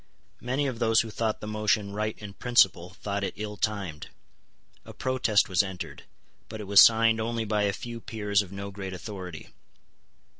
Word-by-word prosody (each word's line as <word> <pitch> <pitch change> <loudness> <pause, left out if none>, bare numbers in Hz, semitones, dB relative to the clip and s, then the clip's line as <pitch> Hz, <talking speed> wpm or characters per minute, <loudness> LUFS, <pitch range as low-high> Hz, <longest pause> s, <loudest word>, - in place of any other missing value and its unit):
Many 130 +4 -1
of 130 -4 -3
those 115 -1 +4
who 115 - -6
thought 110 0 -2
the 105 - -6
motion 105 -1 0
right 105 +1 -2
in 105 -2 -9
principle 95 -6 +2
thought 100 -1 -2
it 95 - -3
ill 105 0 -5
timed. 100 -7 -3 0.8
A - - -11
protest 130 -5 +2
was 95 -1 +3
entered; 90 -4 -7 0.4
but 110 - -7
it - - -5
was 100 0 +8
signed 115 0 +5
only 115 0 -2
by 105 -1 +1
a 100 - +2
few 120 +3 -7
peers 105 -3 0
of 95 -3 -9
no 100 0 -6
great 95 -1 -6
authority. 90 -4 -8
105 Hz, 180 wpm, -27 LUFS, 100-115 Hz, 0.8 s, was